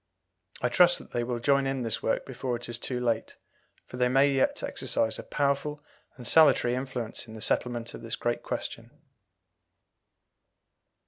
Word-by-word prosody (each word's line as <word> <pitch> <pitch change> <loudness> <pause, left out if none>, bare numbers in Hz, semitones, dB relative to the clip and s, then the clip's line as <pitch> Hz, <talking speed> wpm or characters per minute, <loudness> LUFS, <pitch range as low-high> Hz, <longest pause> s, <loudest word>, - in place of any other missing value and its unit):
I - - +2
trust 175 -1 +5
that - - -12
they 120 - -1
will 120 0 -3
join 140 +2 +2
in 135 -2 -2
this 115 -1 0
work - - -1
before 130 -1 -3
it 120 - -6
is 120 -1 -2
too 125 0 -2
late, 115 -2 -1 0.5
for 125 - -10
they 125 0 +2
may 135 +2 +4
yet 135 -1 +1
exercise 110 -1 -1
a - - -6
powerful 145 +1 -1 0.3
and 120 -2 -5
salutary 145 -6 +6
influence 125 -3 -4
in 110 - -10
the - - -8
settlement 120 +1 0
of - - -9
this 115 0 -4
great 120 0 -2
question. - - -5
125 Hz, 170 wpm, -28 LUFS, 120-135 Hz, 0.5 s, salutary